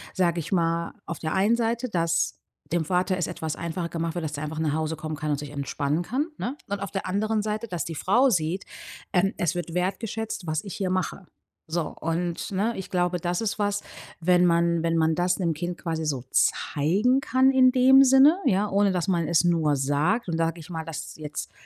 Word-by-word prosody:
sage 175 -2 +1
ich 160 - -6
mal, 170 -2 0
auf 170 - -5
der 155 -1 -2
einen 210 +5 +3
Seite, 235 +2 0
dass 165 -3 0 0.3
dem 170 -1 +1
Vater 185 +2 +1
es 180 - -1
etwas 160 -1 -4
einfacher 170 0 -4
gemacht 165 0 -3
wird, 170 - -2
dass 150 -1 -4
er 150 - -4
einfach 155 +1 -5
nach 155 -2 0
Hause 160 0 -1
kommen 155 -1 -4
kann 155 -1 -3
und 145 - +1
sich 145 -1 -7
entspannen 145 +2 -1
kann, 270 - -1
ne? 265 +5 -3
Und 200 0 -3
auf 200 - -3
der 195 - -3
anderen 210 +2 0
Seite, 215 +2 -3
dass 175 -4 -3
die 165 - -5
Frau 245 - +3
sieht, 170 +1 0 0.5
ähm, 195 +2 +2
es 170 -1 0
wird 175 -1 -4
wertgeschätzt, 195 +1 -3
was 155 +4 -1
ich 200 - -7
hier 190 -2 -2
mache, 185 +1 -2 0.4
so. 165 +1 -1 0.2
Und, 170 +3 -2
ne, 210 +5 0
ich 190 - -6
glaube, 180 -1 0
das 175 +1 -1
ist 215 -1 -2
was, 205 0 0 0.4
wenn 180 +1 +4
man 170 -1 +2
wenn 165 0 +1
man 160 0 +2
das 180 0 +1
'nem 170 -3 +1
Kind 175 +3 -4
quasi 160 -2 -3
so 135 -5 -2
zeigen 205 - +2
kann, 260 +3 +3
in 255 -1 +5
dem 265 +1 +7
Sinne, 270 +6 +6
ja, 200 +2 +2
ohne 200 0 +3
dass 180 0 -1
man 170 -4 +1
es 170 0 +3
nur 160 -4 +2
sagt, 150 - +1
dann 165 -1 -1
sage 165 0 0
ich 155 - -11
mal, 160 -2 -5
dass 160 0 -6
jetzt 150 -1 -6
175 Hz, 220 wpm, -25 LUFS, 160-205 Hz, 0.5 s, dem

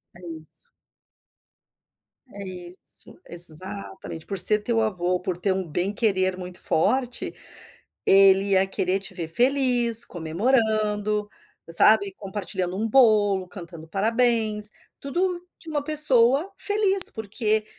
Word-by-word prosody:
É 175 - -16
isso. 165 -2 -10 1.9
É 200 - -9
isso, 180 - -12
exatamente, 175 0 -5
por 195 -2 0
ser 210 +4 +6
teu 230 0 -1
avô, 180 -4 -1
por 180 -1 -5
ter 185 +2 -1
um 190 -1 -4
bem 175 +6 -3
querer 190 -4 0
muito 180 -1 -9
forte, 250 +9 0 0.7
ele 195 0 +4
ia 190 0 +3
querer 190 0 -1
te 195 - -9
ver 170 -3 -5
feliz, 245 - +3
comemorando, 210 +3 -1 0.4
sabe? 200 +3 +3
Compartilhando 190 -2 -5
um 220 - -2
bolo, 210 -6 +2
cantando 170 -3 -11
um - - -22
parabéns, 220 +1 +1 0.3
tudo 350 +5 -3
de 325 - -12
uma 295 -2 -3
pessoa 290 0 +3
feliz, 405 -2 +3
porque 215 0 -1
205 Hz, 120 wpm, -23 LUFS, 185-235 Hz, 1.9 s, ser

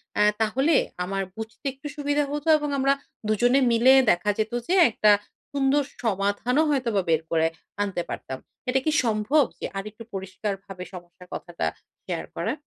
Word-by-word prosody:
অ্যা 210 - +4 0.2
তাহলে 265 +9 +2 0.3
আমার 195 +1 -2
বুঝতে 220 +5 -8
একটু 275 +2 -9
সুবিধা 290 0 +1
হতো 295 +2 -4
এবং 295 -1 -3
আমরা 275 +1 +4 0.3
দুজনে 245 +5 +3
মিলে 240 +3 +6 0.2
দেখা 175 +4 0
যেতো 220 +2 -1
যে 365 - +2 0.2
একটা 215 0 +4 0.4
সুন্দর 280 +1 +2 0.2
সমাধানও 210 +7 +1
হয়তো 265 -5 +1
বা 195 - +3
বের 160 -1 +3
করে 160 -1 +3 0.4
আনতে 195 -4 -2
পারতাম। 130 - -5 0.3
এটা 265 +1 +3
কি 310 - +3
সম্ভব, 230 +7 +3 0.2
যে - - -4
আরেকটু 215 +3 -7
পরিষ্কারভাবে 195 0 -5
সমস্যার 180 0 -12
কথাটা 175 -1 -4 0.4
শেয়ার - - -3
করা? - - -1
220 Hz, 155 wpm, -25 LUFS, 195-275 Hz, 0.4 s, মিলে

